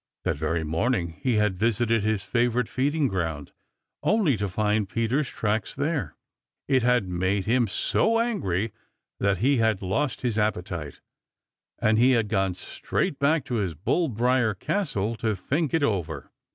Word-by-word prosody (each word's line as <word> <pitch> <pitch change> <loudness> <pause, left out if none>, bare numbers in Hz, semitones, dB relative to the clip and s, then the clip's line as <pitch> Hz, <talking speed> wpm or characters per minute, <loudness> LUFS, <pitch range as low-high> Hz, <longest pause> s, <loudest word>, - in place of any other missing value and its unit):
That - - 0
very 80 +2 -1
morning 85 +2 -1
he 125 -3 +1
had 105 -4 +1
visited 115 +1 +2
his 105 -2 0
favorite 120 0 +1
feeding 145 +3 +1
ground, 80 - -3 0.5
only 200 - +2
to 100 -1 -2
find 105 0 0
Peter's 115 +7 0
tracks 110 0 -2
there. 145 +1 -2 0.5
It 130 -2 +3
had 120 -4 +2
made 95 +2 0
him 120 +1 +2
so 225 - +1
angry 110 - -1 0.5
that 100 -1 +2
he 140 0 +4
had 110 -4 +1
lost 130 +10 -1
his 115 -4 0
appetite, 90 -7 -2 0.8
and 110 0 +2
he 130 +2 +5
had 115 -4 +1
gone 95 -4 +1
straight 135 - -3
back 140 0 +2
to 125 - -2
his 95 -6 -1
bull 160 - 0
briar 120 -1 +1
castle 115 - -1
to 110 -2 0
think 140 - -1
it 165 -3 +1
over. 95 - -2
110 Hz, 155 wpm, -26 LUFS, 95-130 Hz, 0.8 s, he